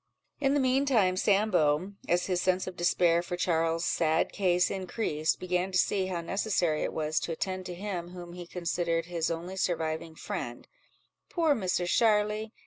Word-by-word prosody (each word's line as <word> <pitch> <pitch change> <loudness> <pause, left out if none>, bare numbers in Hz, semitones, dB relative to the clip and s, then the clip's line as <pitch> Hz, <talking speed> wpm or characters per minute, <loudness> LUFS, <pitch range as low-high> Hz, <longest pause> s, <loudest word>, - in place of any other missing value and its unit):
In 275 0 +2
the - - +3
mean 265 +1 +2
time, 205 -9 +3
Sambo, 185 -4 +2 0.2
as 175 +1 +2
his 180 -2 0
sense 185 0 +1
of 185 - -6
despair 175 -1 +3
for 175 0 -5
Charles's 165 -1 +1
sad 160 -1 +1
case 180 -3 +2
increased, 180 -5 -1
began 180 +1 -1
to 185 - +1
see 190 0 +2
how 180 -2 -3
necessary 175 -3 0
it - - -1
was 155 0 -1
to - - -4
attend 185 +3 -3
to 180 - -6
him 180 -2 -4
whom 175 -1 -9
he 175 -1 -8
considered 170 -1 -1
his 170 -2 -2
only 170 +3 -4
surviving 160 -3 -2
friend—"Poor 205 - -4
Misser 185 -6 0
Sharly! 210 +2 +2
180 Hz, 165 wpm, -29 LUFS, 170-195 Hz, 0.2 s, the